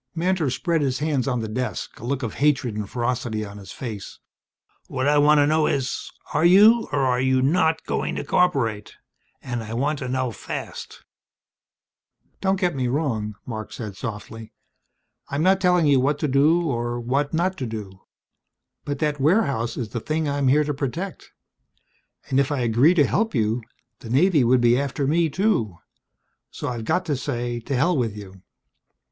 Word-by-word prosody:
Mantor 170 Hz, -3 st, +1 dB
spread 165 Hz, +5 st, 0 dB
his 130 Hz, -2 st, 0 dB
hands 145 Hz, -4 st, -1 dB
on 125 Hz, -3 st, 0 dB
the 110 Hz, -, -3 dB
desk, 110 Hz, -2 st, -4 dB
a -, -, -12 dB
look 130 Hz, +2 st, -2 dB
of 115 Hz, -, -3 dB
hatred 135 Hz, -6 st, +1 dB
and 105 Hz, -1 st, -4 dB
ferocity 120 Hz, -3 st, -2 dB
on 100 Hz, 0 st, -10 dB
his 100 Hz, -, -11 dB
face. 110 Hz, -6 st, -7 dB, 0.7 s
"What 130 Hz, +2 st, -2 dB
I 145 Hz, 0 st, +4 dB
want 150 Hz, +1 st, +5 dB
to 145 Hz, -, +5 dB
know 155 Hz, +1 st, +2 dB
is 135 Hz, -2 st, -2 dB, 0.2 s
are -, -, +1 dB
you 210 Hz, +7 st, +6 dB
or 145 Hz, -, +1 dB
are 125 Hz, -2 st, +2 dB
you 130 Hz, 0 st, +2 dB
not 160 Hz, +2 st, +2 dB
going -, -, -2 dB
to -, -, -3 dB
cooperate? 130 Hz, -13 st, 0 dB, 0.5 s
And 120 Hz, -3 st, -3 dB
I 110 Hz, +1 st, -6 dB
want 145 Hz, +4 st, 0 dB
to 130 Hz, -, -4 dB
know 130 Hz, -1 st, -1 dB
fast." 105 Hz, -, -7 dB, 1.4 s
"Don't 190 Hz, -1 st, +1 dB
get 180 Hz, -2 st, +1 dB
me 130 Hz, -2 st, -1 dB
wrong," 120 Hz, -7 st, -1 dB
Marc 110 Hz, -3 st, -6 dB
said 105 Hz, -4 st, -7 dB
softly. 110 Hz, 0 st, -7 dB, 0.8 s
"I'm 140 Hz, +3 st, -1 dB
not 190 Hz, +1 st, +3 dB
telling 180 Hz, -2 st, +3 dB
you 140 Hz, -3 st, +4 dB
what 140 Hz, +3 st, +1 dB
to 150 Hz, -, +1 dB
do 155 Hz, +6 st, +3 dB
or 120 Hz, -2 st, -2 dB
what 135 Hz, +4 st, -1 dB
not 180 Hz, +3 st, 0 dB
to 130 Hz, -, -3 dB
do. 100 Hz, -4 st, -7 dB, 0.8 s
But 145 Hz, 0 st, -3 dB
that 150 Hz, -1 st, -1 dB
warehouse 140 Hz, -, +1 dB
is 115 Hz, -4 st, -3 dB
the 120 Hz, -, -4 dB
thing 155 Hz, +5 st, -2 dB
I'm 140 Hz, -1 st, 0 dB
here 145 Hz, +4 st, +4 dB
to 150 Hz, 0 st, -2 dB
protect. 150 Hz, +8 st, -5 dB, 1.0 s
And 135 Hz, -, +1 dB
if 140 Hz, +1 st, +1 dB
I -, -, +1 dB
were 130 Hz, -, -2 dB
to -, -, 0 dB
agree 120 Hz, +9 st, +4 dB
to 150 Hz, -4 st, +5 dB
help 225 Hz, +2 st, 0 dB
you, 110 Hz, +1 st, +1 dB, 0.4 s
the 115 Hz, -, -10 dB
Navy 150 Hz, +3 st, +4 dB
would 125 Hz, +1 st, +3 dB
be 120 Hz, +1 st, +4 dB
after 140 Hz, 0 st, -2 dB
me, 160 Hz, +3 st, +2 dB
too. 145 Hz, -, 0 dB, 0.7 s
So -, -, -5 dB
I've 115 Hz, -3 st, -5 dB
got 180 Hz, +8 st, 0 dB
to 150 Hz, -4 st, 0 dB
say 120 Hz, -3 st, -3 dB
to 135 Hz, +4 st, -4 dB
hell 170 Hz, +8 st, +2 dB
with 115 Hz, -6 st, -1 dB
you." 95 Hz, -2 st, -11 dB
135 Hz, 190 wpm, -23 LUFS, 120-155 Hz, 1.4 s, you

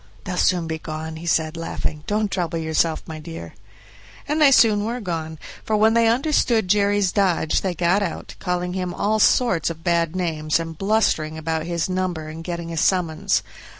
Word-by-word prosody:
"They'll 180 Hz, -, -4 dB
soon 180 Hz, -1 st, +2 dB
be 160 Hz, 0 st, -4 dB
gone," 160 Hz, 0 st, -6 dB
he 170 Hz, +2 st, -8 dB
said, 160 Hz, -1 st, +1 dB
laughing; 160 Hz, -2 st, -4 dB
"don't 210 Hz, -1 st, 0 dB
trouble 170 Hz, -3 st, -2 dB
yourself, 160 Hz, 0 st, 0 dB
my 160 Hz, -1 st, -7 dB
dear." 155 Hz, -, -8 dB, 0.7 s
And 305 Hz, +2 st, 0 dB
they 295 Hz, -, +8 dB
soon 215 Hz, -5 st, +5 dB
were 235 Hz, +3 st, -3 dB
gone, 165 Hz, -6 st, -4 dB, 0.3 s
for 215 Hz, -, 0 dB
when 220 Hz, +1 st, +4 dB
they 230 Hz, 0 st, +4 dB
understood 235 Hz, -3 st, +2 dB
Jerry's 205 Hz, -1 st, +2 dB
dodge 180 Hz, -5 st, +1 dB
they 185 Hz, -2 st, -2 dB
got 175 Hz, +4 st, +2 dB
out, 180 Hz, -5 st, -4 dB
calling 180 Hz, -1 st, -2 dB
him 180 Hz, -1 st, -3 dB
all 215 Hz, +1 st, +1 dB
sorts 200 Hz, -, +3 dB
of 165 Hz, 0 st, -8 dB
bad 170 Hz, -1 st, +1 dB
names 160 Hz, -4 st, 0 dB
and 165 Hz, -1 st, -5 dB
blustering 195 Hz, -5 st, +1 dB
about 160 Hz, 0 st, -2 dB
his 170 Hz, -1 st, -1 dB
number 185 Hz, -4 st, -2 dB
and 160 Hz, +1 st, -8 dB
getting 170 Hz, -1 st, -5 dB
a -, -, -5 dB
summons. 165 Hz, -2 st, +1 dB
175 Hz, 185 wpm, -22 LUFS, 160-205 Hz, 0.7 s, they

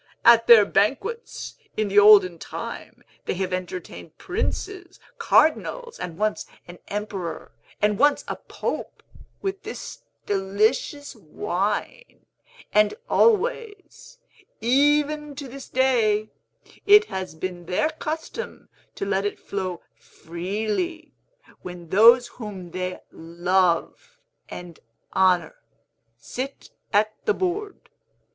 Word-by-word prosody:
At 230 Hz, -1 st, +7 dB
their 225 Hz, -3 st, +9 dB
banquets, 280 Hz, -, -1 dB, 0.2 s
in 215 Hz, -1 st, +1 dB
the 200 Hz, +1 st, +5 dB
olden 200 Hz, -5 st, +7 dB
time, -, -, -8 dB, 0.2 s
they -, -, -2 dB
have 185 Hz, 0 st, -2 dB
entertained 180 Hz, -3 st, -6 dB
princes, 375 Hz, -2 st, -4 dB, 0.2 s
cardinals, 465 Hz, +4 st, +2 dB
and 170 Hz, -2 st, -6 dB
once 215 Hz, +1 st, -1 dB, 0.2 s
an 175 Hz, 0 st, -11 dB
emperor 200 Hz, -4 st, -5 dB, 0.3 s
and 210 Hz, -1 st, +2 dB
once 290 Hz, +1 st, +3 dB
a -, -, -3 dB
pope, -, -, -5 dB, 0.4 s
with 390 Hz, 0 st, -3 dB
this 425 Hz, +3 st, -8 dB, 0.3 s
delicious 215 Hz, +9 st, 0 dB
wine, 205 Hz, -, -4 dB, 0.5 s
and 210 Hz, 0 st, +4 dB, 0.2 s
always, 455 Hz, 0 st, 0 dB, 0.4 s
even 290 Hz, +4 st, +2 dB
to 280 Hz, 0 st, -7 dB
this 270 Hz, +2 st, -10 dB
day, 225 Hz, -5 st, +2 dB, 0.6 s
it 415 Hz, +1 st, +8 dB
has 190 Hz, -, -5 dB
been 175 Hz, +1 st, -6 dB
their 245 Hz, -, +1 dB
custom 320 Hz, +10 st, -6 dB, 0.3 s
to -, -, -4 dB
let 195 Hz, 0 st, 0 dB
it 205 Hz, -, -3 dB
flow 185 Hz, -3 st, -5 dB
freely, 215 Hz, -, -4 dB, 0.5 s
when 175 Hz, -2 st, -9 dB
those 235 Hz, +6 st, +7 dB
whom 195 Hz, -7 st, -9 dB
they 185 Hz, +1 st, -4 dB
love 175 Hz, +1 st, -1 dB, 0.3 s
and 175 Hz, -2 st, -9 dB, 0.3 s
honor 180 Hz, -3 st, +2 dB, 0.6 s
sit 255 Hz, -, -7 dB, 0.2 s
at 215 Hz, +1 st, +2 dB
the 430 Hz, -, +2 dB
board. 395 Hz, +3 st, -3 dB
215 Hz, 110 wpm, -24 LUFS, 185-305 Hz, 0.6 s, their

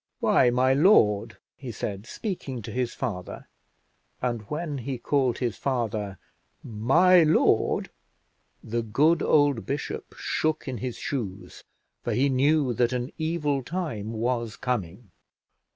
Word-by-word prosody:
"Why, 125 Hz, -, +4 dB
my 130 Hz, +2 st, +3 dB
lord," 135 Hz, -, +4 dB, 0.2 s
he 130 Hz, -3 st, -7 dB
said, 105 Hz, -1 st, -5 dB
speaking 135 Hz, -, -5 dB
to -, -, -7 dB
his 125 Hz, -2 st, -2 dB
father; 90 Hz, -6 st, -5 dB, 0.7 s
and 120 Hz, -3 st, -2 dB
when 150 Hz, -2 st, -3 dB
he 130 Hz, +1 st, -4 dB
called 130 Hz, -1 st, +1 dB
his 120 Hz, -4 st, -2 dB
father 110 Hz, -7 st, -2 dB, 0.5 s
"my 160 Hz, +12 st, +4 dB
lord," 155 Hz, 0 st, +2 dB, 0.7 s
the 115 Hz, +1 st, -2 dB
good 145 Hz, +9 st, +2 dB
old 145 Hz, -6 st, +3 dB
bishop 140 Hz, +1 st, -4 dB
shook 155 Hz, -1 st, -1 dB
in 125 Hz, -4 st, -4 dB
his 125 Hz, +2 st, -4 dB
shoes, 105 Hz, -9 st, -5 dB, 0.4 s
for -, -, -2 dB
he 140 Hz, +3 st, +2 dB
knew 135 Hz, 0 st, +2 dB
that 120 Hz, +2 st, +1 dB
an 125 Hz, +2 st, -3 dB
evil 155 Hz, -4 st, 0 dB
time 125 Hz, -, -4 dB
was 115 Hz, 0 st, -1 dB
coming. 105 Hz, -4 st, -4 dB
125 Hz, 130 wpm, -26 LUFS, 115-145 Hz, 0.7 s, Why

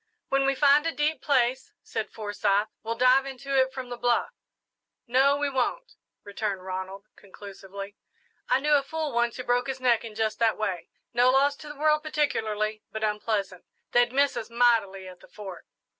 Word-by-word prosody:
"When 275 Hz, 0 st, +2 dB
we 275 Hz, -, +2 dB
find 290 Hz, +3 st, +4 dB
a -, -, +1 dB
deep 305 Hz, 0 st, -1 dB
place," 260 Hz, -2 st, +1 dB
said 220 Hz, -, -4 dB
Forsyth, 205 Hz, -1 st, 0 dB
"we'll 230 Hz, +1 st, -3 dB
dive 255 Hz, +3 st, +4 dB
into 275 Hz, +1 st, -4 dB
it 260 Hz, 0 st, +3 dB
from 260 Hz, -2 st, -7 dB
the 245 Hz, -, -5 dB
bluff." 240 Hz, 0 st, +1 dB, 0.7 s
"No 270 Hz, +3 st, +3 dB
we 290 Hz, 0 st, 0 dB
won't," 285 Hz, -, -2 dB, 0.3 s
returned 200 Hz, -2 st, -4 dB
Ronald, 190 Hz, +1 st, -6 dB
conclusively. 200 Hz, 0 st, -10 dB, 0.5 s
"I 265 Hz, -, +3 dB
knew 300 Hz, +1 st, +2 dB
a 285 Hz, -, +5 dB
fool 310 Hz, +1 st, -4 dB
once 235 Hz, -1 st, 0 dB
who 250 Hz, -, -5 dB
broke 245 Hz, +1 st, +1 dB
his 265 Hz, -1 st, -4 dB
neck 245 Hz, -3 st, +2 dB
in 225 Hz, -2 st, -9 dB
just 220 Hz, -1 st, -1 dB
that 225 Hz, -2 st, +2 dB
way. 190 Hz, -6 st, -3 dB, 0.2 s
No 245 Hz, +1 st, +4 dB
loss 275 Hz, +2 st, +3 dB
to 300 Hz, -, -11 dB
the 295 Hz, -, -8 dB
world 305 Hz, +1 st, +3 dB
particularly, 220 Hz, -9 st, -1 dB
but 220 Hz, 0 st, -5 dB
unpleasant. 210 Hz, -3 st, -2 dB, 0.3 s
They'd 240 Hz, 0 st, +3 dB
miss 280 Hz, +2 st, +2 dB
us 225 Hz, -, -5 dB
mightily 225 Hz, -6 st, +2 dB
at 180 Hz, -1 st, -12 dB
the -, -, -17 dB
Fort." 195 Hz, -4 st, -10 dB
240 Hz, 185 wpm, -27 LUFS, 210-275 Hz, 0.7 s, a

